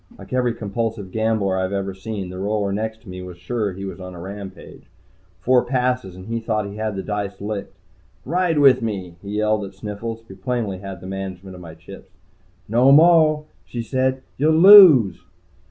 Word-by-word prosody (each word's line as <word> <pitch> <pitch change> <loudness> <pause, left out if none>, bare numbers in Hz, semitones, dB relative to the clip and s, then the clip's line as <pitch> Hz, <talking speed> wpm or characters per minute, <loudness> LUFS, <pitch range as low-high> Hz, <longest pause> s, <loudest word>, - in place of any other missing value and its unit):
Like - - -11
every 125 -2 0
compulsive 110 -2 -4
gambler 110 -3 0
I've 95 0 -2
ever 100 -1 -3
seen, 95 -1 -6
the 90 - -8
roller 100 0 -1
next 110 +2 -4
to 105 - -14
me 90 0 -7
was 90 -1 -9
sure 105 +3 -3
he 95 +2 -7
was 95 -2 -7
on 90 0 -9
a - - -10
rampage. 95 +2 -10 0.6
Four 125 0 +3
passes 125 -6 -1
and 90 0 -11
he 115 +2 -3
thought 110 -2 -2
he 100 +1 -8
had 110 -1 -3
the 95 - -4
dice 105 -1 -4
licked. 105 0 -6 0.5
"Ride 170 +2 0
with 140 -3 +5
me!" 95 -6 -5
he 100 +1 -6
yelled 105 0 +1
at 100 0 -9
Sniffles, 110 +3 -6
who 95 - -11
plainly 100 -1 -3
had 95 -2 -8
the - - -11
management 95 0 -7
of 90 - -11
my 80 -2 -11
chips. 95 +3 -13 0.6
"No 120 +5 +4
moah," 155 0 +5 0.2
she 120 -1 -6
said. 130 +2 -1 0.2
"You'll 155 +3 +3
lose." 165 - +8
105 Hz, 190 wpm, -21 LUFS, 95-120 Hz, 0.6 s, lose